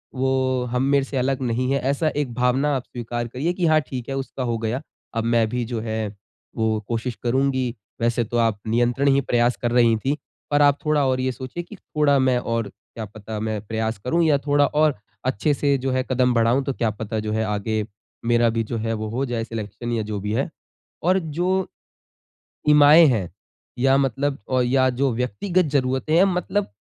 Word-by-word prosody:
वो 130 Hz, -1 st, +1 dB
हम 125 Hz, +1 st, +1 dB
मेरे 140 Hz, 0 st, +3 dB
से 135 Hz, -, -5 dB
अलग 130 Hz, +1 st, 0 dB
नहीं 125 Hz, +1 st, 0 dB
है 140 Hz, -, +2 dB
ऐसा 145 Hz, +3 st, +1 dB
एक 140 Hz, -5 st, -1 dB
भावना 130 Hz, +4 st, +1 dB
आप 130 Hz, -, -2 dB
स्वीकार 120 Hz, 0 st, -5 dB
करिए 140 Hz, +9 st, -2 dB
कि 180 Hz, -1 st, -1 dB
हाँ, 155 Hz, -1 st, +5 dB
ठीक 130 Hz, -2 st, -7 dB
है 135 Hz, -, -2 dB
उसका 135 Hz, -1 st, -4 dB
हो 120 Hz, -2 st, -1 dB
गया। 115 Hz, +4 st, -2 dB, 0.3 s
अब 115 Hz, -, 0 dB
मैं 115 Hz, -1 st, +2 dB
भी 125 Hz, +1 st, -2 dB
जो 115 Hz, 0 st, -3 dB
है 110 Hz, -2 st, -3 dB, 0.4 s
वो 110 Hz, -1 st, +1 dB
कोशिश 115 Hz, +1 st, -2 dB
करुँगी। 130 Hz, 0 st, +1 dB, 0.3 s
वैसे 120 Hz, 0 st, +1 dB
तो 120 Hz, +2 st, -3 dB
आप 115 Hz, -3 st, +2 dB
नियंत्रण 120 Hz, +4 st, +1 dB
ही 140 Hz, 0 st, +5 dB
प्रयास 120 Hz, -1 st, +2 dB
कर 120 Hz, -1 st, 0 dB
रही 120 Hz, -2 st, +4 dB
थी। 135 Hz, +6 st, -1 dB, 0.3 s
पर 145 Hz, 0 st, +3 dB
आप 145 Hz, -1 st, +5 dB
थोड़ा 150 Hz, -2 st, +2 dB
और 130 Hz, 0 st, +1 dB
ये 130 Hz, 0 st, 0 dB
सोचिए 130 Hz, +7 st, -6 dB
कि 175 Hz, -, -12 dB
थोड़ा 150 Hz, -6 st, +1 dB
मैं 130 Hz, -1 st, +3 dB
और 115 Hz, -2 st, -2 dB
क्या 110 Hz, +3 st, -10 dB
पता 110 Hz, +1 st, -7 dB
मैं 110 Hz, -1 st, -2 dB
प्रयास 110 Hz, +1 st, -2 dB
करूँ 170 Hz, +6 st, +2 dB
या 150 Hz, -3 st, +4 dB
थोड़ा 145 Hz, 0 st, +2 dB
और 150 Hz, 0 st, +2 dB, 0.3 s
अच्छे 130 Hz, +4 st, +1 dB
से 140 Hz, 0 st, +1 dB
जो 135 Hz, 0 st, -2 dB
है 130 Hz, 0 st, +1 dB
कदम 125 Hz, -1 st, +2 dB
बढ़ाऊँ 115 Hz, +3 st, +3 dB
तो 135 Hz, -, -1 dB
क्या 115 Hz, -3 st, 0 dB
पता 110 Hz, +1 st, -4 dB
जो 105 Hz, 0 st, -3 dB
है 110 Hz, +1 st, 0 dB
आगे 105 Hz, +1 st, -1 dB, 0.4 s
मेरा 120 Hz, 0 st, +3 dB
भी 115 Hz, 0 st, 0 dB
जो 115 Hz, +2 st, -4 dB
है 115 Hz, +1 st, -2 dB
वो 110 Hz, 0 st, -3 dB
हो 130 Hz, +5 st, -1 dB
जाए 120 Hz, -3 st, -2 dB
सिलेक्शन 115 Hz, +1 st, -5 dB
या 115 Hz, -1 st, 0 dB
जो 105 Hz, -1 st, -4 dB
भी 105 Hz, +2 st, -3 dB
है। 135 Hz, +7 st, 0 dB, 0.5 s
और 185 Hz, +3 st, +3 dB
जो, 180 Hz, +3 st, -1 dB, 1.0 s
इमाएँ 150 Hz, +3 st, +8 dB
हैं 105 Hz, -9 st, 0 dB, 0.5 s
या 135 Hz, +2 st, +4 dB
मतलब 135 Hz, +1 st, 0 dB
अ, 130 Hz, -1 st, +3 dB
या 130 Hz, +1 st, +3 dB
जो 130 Hz, +1 st, 0 dB
व्यक्तिगत 125 Hz, -, 0 dB
जरूरतें 130 Hz, +3 st, 0 dB
है 180 Hz, +3 st, +6 dB
मतलब 195 Hz, +2 st, 0 dB
125 Hz, 205 wpm, -23 LUFS, 115-140 Hz, 1.0 s, इमाएँ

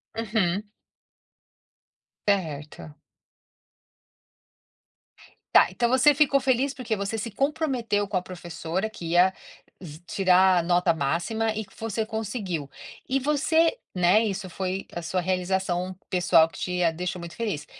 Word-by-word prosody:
Uhum. 210 Hz, -3 st, -1 dB, 1.6 s
Certo. 155 Hz, -6 st, -2 dB, 2.6 s
Tá. -, -, +7 dB
Então 235 Hz, -1 st, 0 dB
você 265 Hz, +3 st, +5 dB
ficou 280 Hz, -1 st, +3 dB
feliz 265 Hz, +1 st, +1 dB
porque 240 Hz, -4 st, -3 dB
você 200 Hz, +2 st, -3 dB
se 220 Hz, +1 st, -4 dB
comprometeu 260 Hz, -6 st, 0 dB
com 195 Hz, -, -1 dB
a -, -, 0 dB
professora 175 Hz, +2 st, -4 dB
que 170 Hz, -6 st, -7 dB
ia 180 Hz, +2 st, +5 dB, 0.5 s
z 155 Hz, -1 st, -9 dB
tirar 185 Hz, -2 st, +4 dB
nota 175 Hz, 0 st, +2 dB
máxima 175 Hz, +10 st, -1 dB
e 220 Hz, -, -3 dB
que -, -, -23 dB
você 220 Hz, 0 st, -2 dB
conseguiu. 210 Hz, -, -4 dB, 0.4 s
E 270 Hz, +1 st, +1 dB
você 315 Hz, -, +2 dB, 0.2 s
né, 180 Hz, +5 st, +4 dB
Isso 195 Hz, -2 st, -3 dB
foi 185 Hz, +2 st, -4 dB
a 175 Hz, -, -4 dB
sua 180 Hz, +2 st, -1 dB
realização 185 Hz, 0 st, -1 dB
pessoal 175 Hz, -3 st, +4 dB
que -, -, -12 dB
te 180 Hz, -1 st, -1 dB
a 165 Hz, -, +3 dB
deixou 180 Hz, +2 st, -4 dB
muito 170 Hz, 0 st, -9 dB
feliz. 200 Hz, -11 st, -3 dB
190 Hz, 130 wpm, -25 LUFS, 175-225 Hz, 2.6 s, Tá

